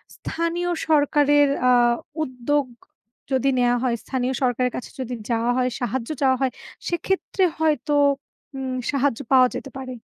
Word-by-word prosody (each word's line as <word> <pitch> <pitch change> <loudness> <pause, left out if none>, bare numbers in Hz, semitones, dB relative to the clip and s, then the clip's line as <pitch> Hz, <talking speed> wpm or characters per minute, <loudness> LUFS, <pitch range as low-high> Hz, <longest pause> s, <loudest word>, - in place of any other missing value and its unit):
স্থানীয় 340 +1 -2 0.2
সরকারের 290 -1 +4 0.2
আ - - +6 0.5
উদ্যোগ 265 +2 -1 0.7
যদি 265 +1 +2
নেওয়া 245 0 +3
হয় 245 -2 +1
স্থানীয় 260 -1 -2
সরকারের 250 0 +1
কাছে 250 - -7
যদি 250 -1 -4 0.2
যাওয়া 230 +1 +1
হয়, 255 0 +2
সাহায্য 245 +1 -2
চাওয়া 260 -2 +3
হয় 265 -2 +1 0.4
সেক্ষেত্রে 375 +2 -1 0.2
হয়তো 295 -2 +1 0.6
উম 260 -1 -3 0.2
সাহায্য 275 -4 0
পাওয়া 255 -1 +7
যেতে 275 - -8
পারে। 255 -1 -6
265 Hz, 135 wpm, -23 LUFS, 250-290 Hz, 0.7 s, পাওয়া